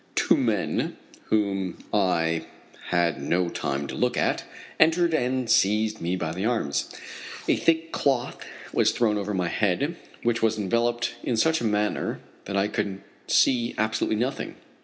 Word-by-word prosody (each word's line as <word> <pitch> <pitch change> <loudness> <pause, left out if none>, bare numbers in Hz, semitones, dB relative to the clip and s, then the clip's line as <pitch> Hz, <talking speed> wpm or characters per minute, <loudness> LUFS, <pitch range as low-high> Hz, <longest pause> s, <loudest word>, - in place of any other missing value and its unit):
Two - - +4
men, - - 0 0.3
whom 100 -4 0 0.2
I 85 -5 +1 0.4
had 85 -4 +1
no 85 +5 +1
time 70 -3 -2
to - - -6
look - - 0
at, - - +1 0.4
entered 165 +1 +4
and 130 -3 0
seized 110 0 +2
me 85 +2 0
by 85 -3 -2
the 95 +3 -4
arms. 110 -11 0 0.6
A - - +4
thick 165 0 +1
cloth 130 -3 0 0.3
was - - +3
thrown 105 -3 +2
over 100 0 -2
my 90 -2 0
head, 110 - 0 0.3
which 120 0 +1
was 110 -1 +2
enveloped 120 +3 0
in 120 - -1
such 160 +7 +3
a - - -1
manner 105 -1 0 0.3
that 100 0 -2
I 100 +1 +2
could 100 -2 -3 0.3
see 120 -2 +3
absolutely 110 0 0
nothing. 125 +5 -2
105 Hz, 155 wpm, -26 LUFS, 95-120 Hz, 0.6 s, Two